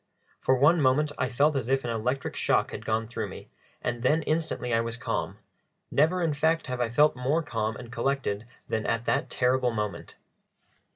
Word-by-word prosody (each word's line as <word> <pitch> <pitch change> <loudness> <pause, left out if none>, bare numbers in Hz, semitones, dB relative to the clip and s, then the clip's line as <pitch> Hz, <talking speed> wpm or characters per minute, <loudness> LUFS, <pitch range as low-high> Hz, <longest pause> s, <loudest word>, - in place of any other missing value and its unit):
For 130 - +3
one 150 +6 +4
moment 145 +3 +3
I 130 - +1
felt 145 +6 +2
as 130 -3 -2
if 135 0 +2
an 120 - -2
electric 125 +4 -2
shock - - +1
had - - -7
gone 110 0 +1
through 120 - -4
me, - - -10 0.3
and 120 0 -2
then 150 +6 +2
instantly 155 -6 -1
I 115 - +3
was 115 0 -4
calm - - -3 0.5
never, 165 +5 +3
in 160 -2 +1
fact, 160 +3 +1
have 125 -1 -3
I 120 - +1
felt 150 +6 +4
more 135 +6 0
calm 110 -6 -2
and 120 0 -9
collected 125 -5 -1 0.2
than 110 -1 -2
at 115 0 0
that - - 0
terrible 125 0 +2
moment. 105 -3 -4
125 Hz, 190 wpm, -27 LUFS, 115-150 Hz, 0.5 s, one